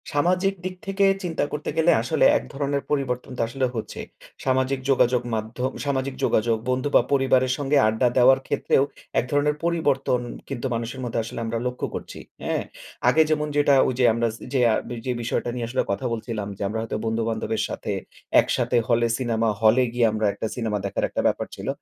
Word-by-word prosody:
সামাজিক 180 +6 +2
দিক 185 0 -3
থেকে 195 0 +1 0.2
চিন্তা 165 -4 -1
করতে 150 0 -4
গেলে 160 +1 +5
আসলে 150 +6 +2
এক - - -5
ধরনের 140 0 -1
পরিবর্তন 130 -3 -1
তো - - -1
আসলে 130 +2 -1
হচ্ছে। 110 -2 -5 0.5
সামাজিক 130 0 +1
যোগাযোগ 125 -2 +3
মাধ্যম 115 +4 -3
সামাজিক 135 -1 -1
যোগাযোগ, 115 +1 +2
বন্ধু 130 +3 0
বা - - +8
পরিবারের 130 -2 +3
সঙ্গে 145 0 +1
আড্ডা 110 +3 +2
দেওয়ার 130 +2 +6
ক্ষেত্রেও 135 - +2 0.4
এক - - -1
ধরনের 145 +1 +2
পরিবর্তন 145 -7 +1 0.3
কিন্তু 135 -2 -4
মানুষের 115 +3 -4
মধ্যে 115 -1 -1
আসলে 115 - -6
আমরা 115 +1 -2
লক্ষ্য 125 0 -3
করছি। - - -7 0.2
হ্যাঁ? - - -1 0.5
আগে 160 - +5
যেমন 150 -1 +1
যেটা 145 -1 +5
ওইযে 125 0 +1
আমরা 115 +1 +1 0.3
সে 135 - +2 0.5
যে 130 - 0
বিষয়টা 120 +1 -1
নিয়ে 120 -2 -3
আসলে 130 +2 0
কথা 100 +6 -2
বলছিলাম 110 -2 -4
যে - - -12
আমরা 110 +3 -3
হয়তো 115 -1 -3
বন্ধু-বান্ধবের 110 0 -1
সাথে - - -4 0.5
একসাথে 125 - 0
হলে, 120 0 +3
সিনেমা 115 -3 0
হলে 115 +4 +5
গিয়ে 120 -2 +3
আমরা 110 0 -1
একটা - - -4
সিনেমা 110 -4 -1
দেখার 100 - -2
একটা - - -1
ব্যাপার - - -1
ছিল। - - -8
130 Hz, 180 wpm, -24 LUFS, 115-140 Hz, 0.5 s, বা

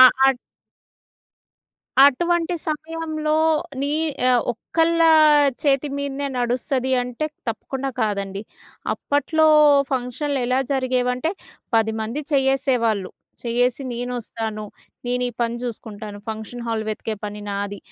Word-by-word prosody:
ఆ - - +12 0.2
ఆట్ 270 -2 +3 1.7
అటువంటి 345 +5 +2
సమయంలో 310 0 -2 0.5
నీ 285 +1 0 0.4
ఆహ్, 245 -2 +4
ఒక్కళ్ళా 330 +7 +2 0.5
చేతి 280 0 +2
మీదనే 280 0 -3
నడుస్తది 255 +2 0
అంటే 250 +5 -3 0.2
తప్పకుండా 270 +4 -3
కాదండి. 200 -1 -2 0.5
అప్పట్లో 315 +2 +1 0.4
ఫంక్షనులు 265 +2 -1
ఎలా 255 +1 +2
జరిగేవంటే, 255 +3 0 0.4
10 220 0 +2
మంది 230 +7 -3
చేయ్యేసేవాళ్ళు. 260 -7 +1 0.3
చేయ్యేసి, 245 +2 +1
నేనొస్తాను 230 -3 -4 0.4
నేనీ 250 0 0
పని 235 0 -1
చూకుంటాను, 215 -3 -6
ఫంక్షన్ 220 +2 -7
హాల్ 220 -1 -1
వెతికే 215 +1 -3
పని 210 0 -7
నాది, 200 0 -3
250 Hz, 100 wpm, -22 LUFS, 225-280 Hz, 1.7 s, ఆ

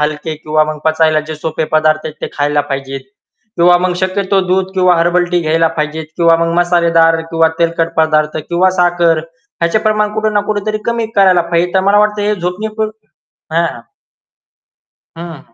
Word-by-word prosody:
हलके 150 +1 -2
किंवा 155 0 0
मग 155 0 -5
पचायला 160 -1 +2
जे 155 - -4
सोपे 155 +1 -3
पदार्थ 155 0 +2
येत, 155 - -7
ते - - -4
खायला 145 0 0
पाहिजेत. 135 0 -4 0.6
किंवा 175 +1 +5
मग 180 0 -1
शक्यतो 190 +1 0
दूध 190 +1 0
किंवा 180 -2 +3
हर्बल 175 +1 +2
टी 175 -1 +1
घ्यायला 165 +1 +1
पाहिजेत. 155 +1 -3
किंवा 165 -1 +4
मग 165 - -1
मसालेदार 165 -2 +3
किंवा 165 0 +3
तेलकट 165 0 0
पदार्थ, 155 -1 +1
किंवा 180 +2 +2
साखर 175 -2 +2 0.4
ह्याचे 170 +6 +2
प्रमाण 215 -1 0
कुठं 215 0 -1
ना 205 - +3
कुठे 205 -1 -1
तरी 215 0 -1
कमी 235 -1 -1
करायला 185 -3 +5
पाहिजे. 175 +1 +1
तर 190 - +4
मला 205 - +4
वाटतं, 210 0 +1
हे 210 0 +1
झोपणे 180 +4 -4
पुर 215 -1 -1 0.6
हां. 165 -8 -1 1.4
हं, 170 0 -7
हं. - - -29
170 Hz, 180 wpm, -14 LUFS, 155-185 Hz, 1.4 s, किंवा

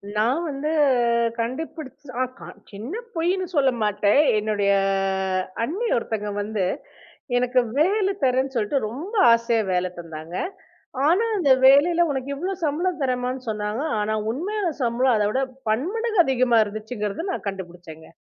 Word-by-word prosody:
நான் 240 +9 +1
வந்து 285 +2 -3 0.7
கண்டுபிடிச்ச 255 - -5 0.2
சின்ன 215 - -7 0.2
பொய்ன்னு 360 +3 0
சொல்ல 270 -3 +4
மாட்டேன். 210 +3 +2 0.2
என்னுடைய 210 -1 0 0.9
அண்ணி 390 - -2
ஒருத்தங்க 220 -3 -2
வந்து 210 -1 -2 0.7
எனக்கு 250 +1 +2 0.2
வேல 385 +5 +3 0.2
தர்றேன்னு 260 +1 +1
சொல்ட்டு 230 +4 0
ரொம்ப 310 - -7 0.2
ஆசையா 230 -1 +1
வேல 180 0 +1
தந்தாங்க. 165 0 -8 0.7
ஆனா 365 +8 +3
அந்த 300 -8 +3
வேலைல 330 +6 +6
"உனக்கு 265 0 -4
இவ்ளோ 365 +7 -3
சம்பளம் 335 +4 -1
தர்றேன்"மான்னு 255 -1 -2
சொன்னாங்க. 210 +2 -2 0.2
ஆனா 210 +1 -1 0.2
உண்மையா 400 - -3 0.2
சம்பளம் 240 +1 +2
அதவிட 210 +5 +1 0.3
பன்மடங்கு 390 - +1
அதிகமா 255 -3 +2
இருந்துச்சுங்கறத 215 - -5
நான் - - -5
கண்டுபிடிச்சேங்க. 175 -4 -10
255 Hz, 120 wpm, -23 LUFS, 210-305 Hz, 0.9 s, வேலைல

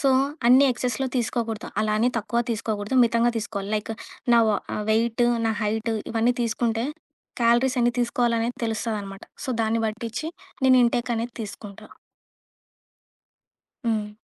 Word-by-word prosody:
So, 275 - +3 0.4
అన్నీ 255 +3 +7
ఎక్సెస్‌లో 250 +2 -2
తీసుకోకూడదు, 230 -2 -2
అలా 215 0 +1
అని 240 +3 +3
తక్కువ 225 +2 -1
తీసుకోకూడదు, 215 +1 -2
మితంగా 235 +1 +2
తీసుకోవాలి. 205 -2 -4
లైక్ 215 +1 -4 0.4
నా 235 - +6
వ 210 - +2 0.3
వెయిటు, 230 +2 +2 0.2
నా 225 - +2
హైటు 220 +2 -1 0.2
ఇవన్నీ 230 +2 +2
తీసుకుంటే 230 0 0 0.6
క్యాలరీస్ 240 +3 +3
ఎన్ని 240 0 +3
తీసుకోవాలనేది 235 0 0
తెలుస్తదనమాట. 215 -3 -3 0.2
సో, - - -7
దాన్ని 225 +1 +1
బట్టిచ్చి 225 +6 -4 0.4
నేను 260 -1 +6
ఇన్‌టేక్ 240 0 0
అనేది 230 +1 -4
తీసుకుంటా. 200 -1 -9 2.0
హ్మ్. 215 -2 0
230 Hz, 125 wpm, -24 LUFS, 215-240 Hz, 2.0 s, అన్నీ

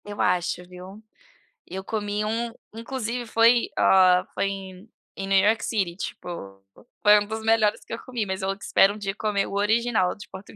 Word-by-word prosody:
Eu 205 0 -9
acho, 180 0 0
viu, 185 +3 -11 0.7
eu 190 +2 -6
comi 205 0 -2
um 230 +2 -2 0.2
inclusive 235 +1 -4
foi, 230 +1 +4
hã, 185 -1 +5
foi - - -1
em 195 +1 -7 0.3
em 195 - -5
New 195 0 +3
York 220 +2 +2
City, 190 -6 -1
tipo, 190 - -7 0.8
foi 210 0 +7
um 205 - -4
dos 220 +1 -4
melhores 220 -1 +2
que - - -8
eu - - -4
comi, 245 -4 -3
mas 190 -1 -4
eu 190 0 0
espero 200 0 +3
um - - -9
dia 195 -2 -3
comer 210 -1 -1
o - - -8
original 210 -1 +1
de 205 - -12
Portugal. 190 +1 -12
205 Hz, 190 wpm, -25 LUFS, 190-225 Hz, 0.8 s, foi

